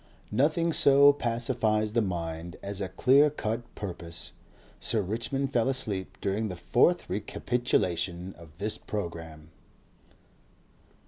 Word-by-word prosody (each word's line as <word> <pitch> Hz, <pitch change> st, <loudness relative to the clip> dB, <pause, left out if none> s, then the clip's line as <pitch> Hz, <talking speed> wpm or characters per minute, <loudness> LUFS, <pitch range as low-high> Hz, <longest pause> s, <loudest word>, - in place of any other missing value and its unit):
Nothing 160 Hz, +4 st, +2 dB
so 140 Hz, 0 st, +6 dB
pacifies 115 Hz, -4 st, 0 dB
the 120 Hz, -, +3 dB
mind 85 Hz, -3 st, -4 dB
as 100 Hz, 0 st, -4 dB
a 95 Hz, -, -3 dB
clear 135 Hz, -, +4 dB
cut 115 Hz, -5 st, -3 dB
purpose. 85 Hz, -4 st, -6 dB, 0.5 s
Sir 110 Hz, -, +3 dB
Richmond 120 Hz, +7 st, -2 dB
fell 120 Hz, +1 st, +2 dB
asleep 105 Hz, -8 st, -1 dB
during 105 Hz, +3 st, -1 dB
the 90 Hz, -, -5 dB
fourth 125 Hz, -, +2 dB
recapitulation 95 Hz, -4 st, -1 dB
of 80 Hz, -1 st, -16 dB
this 105 Hz, +3 st, -2 dB
programme. 80 Hz, -5 st, -6 dB
105 Hz, 115 wpm, -28 LUFS, 90-125 Hz, 0.5 s, so